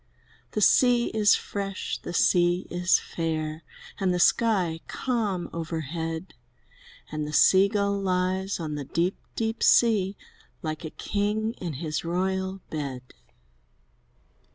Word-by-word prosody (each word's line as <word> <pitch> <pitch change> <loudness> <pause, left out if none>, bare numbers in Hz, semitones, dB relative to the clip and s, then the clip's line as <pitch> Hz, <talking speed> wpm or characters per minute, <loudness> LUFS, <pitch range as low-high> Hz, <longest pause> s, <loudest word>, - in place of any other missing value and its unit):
The 210 - -1
sea 245 +2 +4
is 210 -2 +5
fresh, 195 -1 -4
the - - -7
sea 175 +1 +3
is 175 0 +3
fair. 160 -1 -3 0.4
And 190 -2 +1
the 180 - 0
sky 185 -6 +2
calm 215 -8 -2
overhead, 165 +1 -4 0.8
And 150 -1 -3
the 150 - -6
Sea 190 +5 +6
gull 200 -1 0
lies 185 +1 0
on 155 -2 -4
the 145 -1 -4
deep, 170 +7 0 0.2
deep 225 0 -2
sea. 205 -5 +4 0.5
Like 155 0 -4
a 160 - -4
king 210 +5 -1
in 170 -4 -3
his 155 +3 -3
royal 190 +2 -2
bed. 135 -5 -5
180 Hz, 125 wpm, -26 LUFS, 160-200 Hz, 0.8 s, Sea